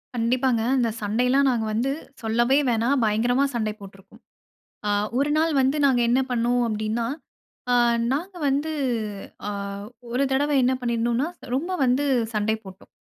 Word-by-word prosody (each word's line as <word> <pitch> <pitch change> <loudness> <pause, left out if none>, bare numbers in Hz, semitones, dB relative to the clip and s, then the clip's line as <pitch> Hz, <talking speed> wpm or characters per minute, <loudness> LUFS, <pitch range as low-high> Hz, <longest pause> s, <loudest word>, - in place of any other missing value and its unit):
கண்டிப்பாங்க. 245 +1 +1 0.2
அந்த 235 -2 +2
சண்டையெல்லாம் 250 +6 +2
நாங்க 230 -3 0
வந்து 250 +5 0 0.3
சொல்லவே 235 +4 +2
வேணாம். 235 +4 +2
பயங்கரமா 240 +5 +2
சண்டை 215 -2 -1
போட்ருக்கோம். 195 0 -14 0.7
அ - - +1 0.3
ஒரு 285 +2 +1
நாள் 325 +1 +2
வந்து 270 +3 +1
நாங்க 255 -3 +3
என்ன 255 +2 +3
பண்ணுனோம் 245 +1 +1
அப்டின்னா, 220 +2 -2 0.7
அ - - +5 0.4
நாங்க 355 +7 -3
வந்து, 290 +4 0 0.8
அ - - -1 0.6
ஒரு 255 - +1
தடவை 290 +2 +1
என்ன 260 +1 +3
பண்ணிருந்தோன்னா, 235 +3 0 0.3
ரொம்ப 325 +8 -1
வந்து 255 +3 +2 0.3
சண்டை 215 +1 +1
போட்டோம். 190 0 -13
245 Hz, 140 wpm, -24 LUFS, 225-270 Hz, 0.8 s, அ